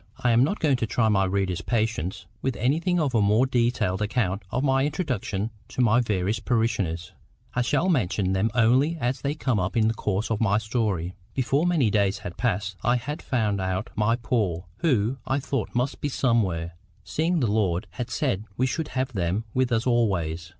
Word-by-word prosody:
I 125 - +1
am 115 +2 +5
not 180 +10 0
going 145 -5 +2
to 115 - -1
try 110 0 +2
my 95 -2 +3
reader's 95 -2 -1
patience 110 -6 -1 0.2
with 130 - -1
anything 165 - +1
of 145 -5 0
a 115 - +3
more 105 +5 +4
detailed 115 -6 0
account 105 -2 0
of 125 +6 -1
my 135 -1 +3
introduction 130 - -2 0.2
to - - -10
my 120 0 +4
various 105 -2 0
parishioners. 105 -8 -1 0.4
I 125 - +1
shall 145 +8 +1
mention 100 - +1
them 95 +4 +1
only 130 +8 +3
as 125 0 -1
they 145 +1 -1
come 130 -8 0
up 90 +5 -1
in 110 -1 +4
the 115 - +2
course 105 0 -2
of 110 - 0
my 100 -2 +3
story. 110 -6 -1 0.2
Before 135 +5 +1
many 150 -11 +2
days 100 -1 +2
had 90 -1 -7
passed 100 -4 -1
I 120 +3 +2
had 135 +5 -4
found 105 -6 0
out 95 +2 -2
my 110 +2 +2
poor, 110 -7 -1
who, 125 -4 +1
I 135 +2 +1
thought, 135 -4 -3
must 125 +3 -1
be 145 - -1
somewhere, 100 - +1 0.3
seeing 165 +2 0
the 130 - +1
Lord 100 -3 +1
had 120 +6 -5
said 120 -8 -1
we 130 - +2
should 155 +4 -2
have 130 0 -1
them 95 +2 -1
with 130 -1 +1
us 115 0 +1
always. 90 -9 0
115 Hz, 195 wpm, -25 LUFS, 100-130 Hz, 0.4 s, am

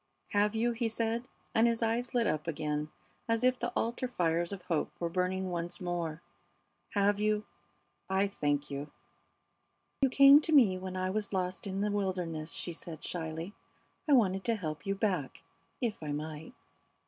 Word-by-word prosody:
"Have 205 +1 +2
you?" 235 +2 +2
he 230 0 -1
said, 230 +2 -1 0.3
and 225 +1 +5
his 230 0 +1
eyes 235 +2 0
lit 235 -1 +3
up 155 -5 -1
again 150 -1 -2 0.4
as 230 +1 +1
if 255 0 +3
the 240 0 -2
altar 235 +3 -1
fires 170 -6 0
of 195 -3 -6
hope 170 -4 -1
were 170 - -1
burning 185 +1 0
once 175 +1 -3
more. 170 -3 -3 0.7
"Have 205 0 +3
you? 215 0 +1 0.6
I 190 +1 +3
thank 145 -6 -1
you." 140 +1 -4 1.1
"You 270 - +5
came 275 +3 +8
to 320 - -3
me 240 -11 +6
when 185 0 -5
I 185 0 0
was 210 0 -2
lost 185 +1 -2
in 195 0 -2
the 210 0 +1
wilderness," 180 -6 -2
she 175 - -2
said, 160 -1 -7
shyly. 165 +2 -3 0.6
"I - - +6
wanted 195 -7 +4
to 230 - +2
help 155 -5 -5
you 195 - +1
back 200 -2 -1 0.4
if 230 -7 -1
I 150 -2 -3
might." 155 - -6
190 Hz, 170 wpm, -32 LUFS, 165-225 Hz, 1.1 s, came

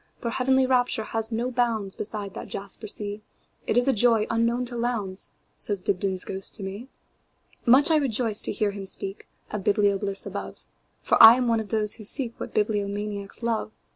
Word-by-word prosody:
Their 235 - -2
heavenly 265 +2 +2
rapture 250 -3 +1
has 225 +1 -2
no 235 +3 -1
boundsBeside 215 -4 -2
that - - -7
jasper 200 +2 -5
sea; 205 0 -3 0.5
It - - +1
is 245 +2 +3
a 270 - +4
joy 225 -1 +3
unknown 235 +2 +1
to 240 0 -5
Lowndes,"Says 210 -3 -4
Dibdin's 185 0 0
ghost 190 0 0
to 205 - -2
me. 200 +6 -6 0.8
Much 280 +7 +6
I 315 - +5
rejoiced 235 -6 -1
to - - -1
hear 205 0 0
him 200 -1 -7
speakOf 195 +1 -5 0.4
biblio 200 -1 +2
bliss 195 -1 -1
above, - - -7 0.4
For - - +3
I 225 +1 +11
am 250 -1 0
one 230 -1 +2
of 215 -2 -6
those 215 -1 0
who 220 - -10
seekWhat 235 +2 0
bibliomaniacs 205 0 -2
love. 225 -2 -1
220 Hz, 170 wpm, -25 LUFS, 200-240 Hz, 0.8 s, I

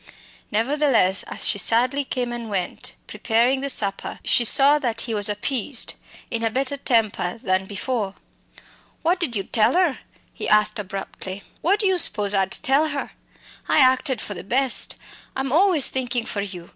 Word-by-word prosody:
Nevertheless, 230 -4 +2
as - - -2
she 200 - +1
sadly 250 +7 +2
came 250 -2 -3
and 235 -2 -6
went, 190 -3 -3
preparing 240 +4 0
the 280 - -2
supper, 200 -6 -2
she 240 - +2
saw 280 +5 +6
that 235 -5 -2
he 230 - -4
was 205 -1 +5
appeased, 235 +4 -3 0.4
in 230 0 -3
a 225 - +1
better 265 +4 -2
temper 225 -8 0
than 185 -2 0
before. 205 0 -3 0.9
"What 350 +3 +1
did 300 -10 0
you 195 - -1
tell 220 - +2
'er?" 350 -7 +1 0.3
he - - -5
asked 210 +1 +3
abruptly. 195 0 -7 0.2
"What 390 +5 +2
do - - -1
you 380 -2 +2
spose 210 -8 +3
I'd 190 -1 +1
tell 290 +2 +2
her? 285 -2 -4 0.6
I - - +2
acted 260 -2 +3
for 205 - -6
the 175 - -8
best. 255 +4 +1 0.4
I'm 265 -1 -2
always 340 -2 +4
thinkin' 245 -2 -2
for 205 - -3
you!" 180 -4 -7
240 Hz, 170 wpm, -22 LUFS, 205-275 Hz, 0.9 s, saw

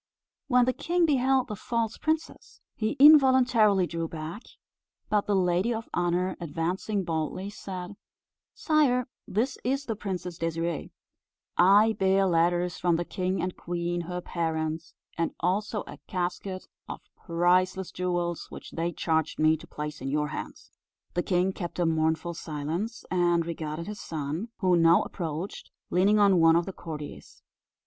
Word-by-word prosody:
When 250 -2 +4
the 255 - +1
king 345 +4 +1
beheld 265 -3 +2
the 215 - -4
false 230 +1 -2
princess, 315 0 -3
he 215 +1 -1
involuntarily 260 -9 +6
drew 165 -1 -3
back; 160 +6 -6 0.7
but 210 -1 +1
the 205 - +2
lady 180 +4 +2
of 225 -1 -3
honour 175 +1 0
advancing 175 +5 -2
boldly, 165 +4 -3
said: 185 -1 -7 0.6
"Sire, 275 -6 +2 0.2
this 245 +6 -1
is 275 +2 -1
the 225 - -2
Princess 180 -4 -5
Désirée; 165 -1 -2 0.7
I 205 +5 +6
bear 195 0 +3
letters 175 0 +1
from 175 -1 +2
the 175 +1 -1
king 185 +2 -2
and 185 0 -3
queen 175 0 -3
her 180 +1 -5
parents, 160 -2 -3 0.2
and 165 - -1
also 205 +4 -1
a - - -10
casket 185 +1 -3 0.2
of - - -6
priceless 180 +2 +1
jewels, 175 -2 -2
which - - -10
they 170 +1 -2
charged 160 -1 -1
me 155 +1 +4
to 160 +2 -12
place 150 -2 -6
in 135 - -3
your 150 +1 0
hands." - - -7 0.4
The 175 - +1
king 180 +1 +1
kept 175 -3 -6
a 175 - +1
mournful 160 +1 0
silence, 165 +9 -4
and 175 -2 +2
regarded 160 -1 -4
his 210 0 -7
son, 155 +6 -4
who 185 -2 +4
now 165 0 +5
approached, 170 +1 -5 0.2
leaning 195 +4 +4
on 200 -3 +5
one 165 0 +6
of 170 0 +2
the 195 - -6
courtiers. 150 -4 -9
180 Hz, 150 wpm, -27 LUFS, 165-210 Hz, 0.7 s, involuntarily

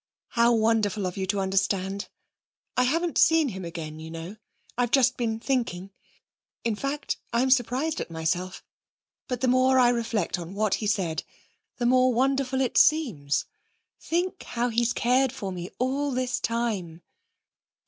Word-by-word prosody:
'How 235 0 +3
wonderful 220 -2 +1
of 180 - -3
you 190 -1 -3
to 200 +1 0
understand! 195 0 0 0.7
I 250 - +3
haven't 330 +6 0
seen 320 -3 +5
him 190 -3 -6
again, 160 -2 -6
you 160 0 -8
know. 165 +5 -7 0.4
I've 245 -1 +1
just 255 0 +4
been 225 -2 -2
thinking. 225 -8 -2 0.7
In 230 -2 0
fact, 275 +6 -3
I'm 255 +3 +2
surprised 260 +5 +1
at - - -5
myself. 175 +3 -2 0.6
But 250 -2 -3
the 260 - +2
more 255 +1 +4
I 250 -1 +6
reflect 230 -7 -1
on 175 +3 -8
what 215 -1 +1
he 210 - -1
said, 180 -6 0 0.5
the 240 - -1
more 255 +1 +4
wonderful 265 +1 +1
it 255 - +2
seems.... 220 - +2 0.5
Think 360 +3 -2
how 240 +1 -2
he's 235 +1 +1
cared 255 +2 +2
for 200 -7 -5
me 180 -1 -6
all 270 +3 0
this 255 -1 -1
time!' 205 -8 -2
235 Hz, 155 wpm, -26 LUFS, 190-255 Hz, 0.7 s, I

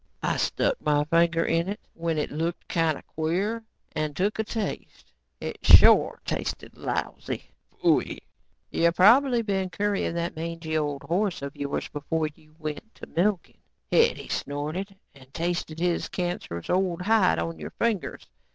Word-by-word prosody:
"I - - +1
stuck - - 0
my 145 -1 +2
finger 165 +2 +3
in 165 +3 +1
it 205 - -4
when 165 -1 -2
it 150 - -1
looked 165 +3 -3
kinda 165 -3 0
queer, 190 +9 -1 0.3
and 155 -1 -2
took 205 +4 0
a - - +2
taste. 210 - -5 0.3
It - - -5
shore - - +7
tasted - - -4
lousy." - - -4 0.3
"You 170 0 0
probably 240 +5 +6
been 195 -3 -1
currying 200 -3 -1
that 170 0 -2
mangey 165 0 -4
old 145 -3 -1
horse 185 -2 0
of 140 0 -5
yours 140 0 -3
before 155 +2 -2
you 155 0 -23
went 155 +8 -6
to - - -9
milking," 185 +1 -1 0.3
Hetty - - +3
snorted, 155 +8 -3 0.2
"and 130 -1 -17
tasted 170 -2 -2
his 175 -1 0
cancerous 175 - -4
old 180 -1 +1
hide 210 - +4
on 85 -1 -3
your 75 - -6
fingers. 225 -5 -2
170 Hz, 145 wpm, -26 LUFS, 155-195 Hz, 0.3 s, shore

